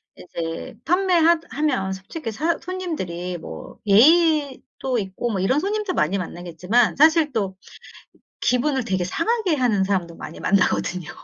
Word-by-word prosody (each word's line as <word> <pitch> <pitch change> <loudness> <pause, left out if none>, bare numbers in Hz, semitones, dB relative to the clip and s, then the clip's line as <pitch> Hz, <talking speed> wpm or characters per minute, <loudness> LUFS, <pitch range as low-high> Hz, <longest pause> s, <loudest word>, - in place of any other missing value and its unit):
이제 165 0 -6
판매하 345 -1 +3
하면 260 -10 -1
솔직히 225 - -6
사 320 +9 0
손님들이 190 - -4
뭐 - - -10
예의도 275 - +3
있고 195 +4 -3
뭐 195 - -2
이런 255 +10 +2
손님들 415 +1 -2
많이 180 +6 +1
만나겠지만 180 +5 0
사실 315 +1 +4
또 195 -5 -2 0.9
기분을 260 +1 +1
되게 190 -2 -1
상하게 370 - 0
하는 235 -8 +2
사람도 185 -4 -1
많이 - - -9
만나거든요. 180 -3 0
245 Hz, 305 characters per minute, -22 LUFS, -, 0.9 s, 사실